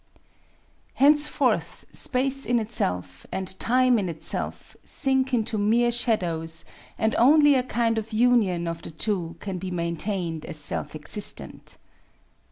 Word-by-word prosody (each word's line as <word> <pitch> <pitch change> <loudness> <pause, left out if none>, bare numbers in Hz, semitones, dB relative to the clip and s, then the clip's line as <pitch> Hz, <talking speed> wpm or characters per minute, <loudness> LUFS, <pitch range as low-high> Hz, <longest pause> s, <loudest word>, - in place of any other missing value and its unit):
Henceforth 295 +2 +2
Space 270 0 -1
in 245 - +2
itself 90 - -1
and 190 - -3
Time 250 0 +3
in 190 -3 -2
itself 160 -2 -1
sink 265 -1 0
into 225 -3 0
mere 235 +4 +2
shadows 170 -9 -1 0.3
and 220 0 0
only 290 +4 +6
a 260 - +3
kind 235 -2 0
of 220 +1 -8
union 215 -7 +2
of 165 0 -4
the - - -8
two 170 0 -2
can 190 -3 -5
he 190 - -4
maintained 170 -1 -2
as - - -6
self 85 - 0
existent. - - -2
215 Hz, 130 wpm, -25 LUFS, 170-245 Hz, 0.3 s, only